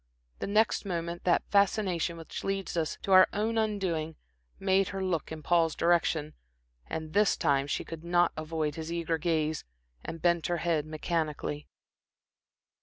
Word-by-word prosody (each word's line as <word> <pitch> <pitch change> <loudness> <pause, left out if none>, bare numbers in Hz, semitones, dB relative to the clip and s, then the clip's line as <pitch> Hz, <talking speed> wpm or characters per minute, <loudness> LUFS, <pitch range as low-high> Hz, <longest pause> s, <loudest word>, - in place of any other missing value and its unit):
The - - -3
next 210 +2 +2
moment 170 -3 -4
that 175 - +3
fascination 195 -4 +2
which 165 -1 -7
leads 195 -2 -2
us 160 -3 -1
to 195 - -2
our 185 0 +8
own 225 +2 0
undoing 185 -7 -1 0.4
made 195 0 +2
her 195 -1 -4
look 170 -6 -1
in 155 -1 -7
Paul's 165 -1 +2
direction, 165 -3 +1 0.5
and 155 -1 -5
this 210 0 +3
time 140 -1 +2
she - - -2
could 165 -1 -8
not 175 0 +3
avoid 155 -1 -2
his 160 +2 -6
eager 170 -1 -1
gaze 155 -3 0 0.4
and 165 - -6
bent 170 -1 +2
her 175 - 0
head 165 -3 0
mechanically. 155 -2 -3
170 Hz, 155 wpm, -29 LUFS, 155-190 Hz, 0.5 s, our